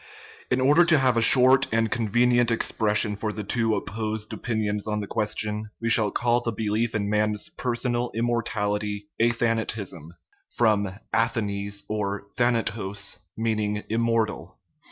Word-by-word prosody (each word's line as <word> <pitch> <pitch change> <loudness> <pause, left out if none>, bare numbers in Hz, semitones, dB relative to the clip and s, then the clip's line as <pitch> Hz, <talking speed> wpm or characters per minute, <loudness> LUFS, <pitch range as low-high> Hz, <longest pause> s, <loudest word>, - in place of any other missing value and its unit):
In 125 - +1
order 145 +6 +5
to 170 -2 +4
have 130 -3 +2
a 115 - +2
short 130 +3 +6
and 115 0 +1
convenient 120 +1 +2
expression 105 -2 0
for 105 +1 -3
the 105 0 -6
two 115 +1 0
opposed 110 0 -4
opinions 105 -3 -2
on 105 0 -1
the 105 - -3
question, 105 0 -2
we 115 - -1
shall 110 -2 +5
call 120 +3 +1
the 120 - -2
belief 110 +2 -1
in 100 -1 -1
man's 105 0 0
personal 120 0 -2
immortality 105 -3 -2
" - - -5
athan 115 -1 +2
atism" 95 -7 -4 0.5
(from 105 -4 +2 0.2
athanes 100 -3 -1
or 100 -2 -3
athanatos 110 -4 -1 0.6
= - - -27
immortal). 115 -1 -1
110 Hz, 140 wpm, -25 LUFS, 105-120 Hz, 0.6 s, short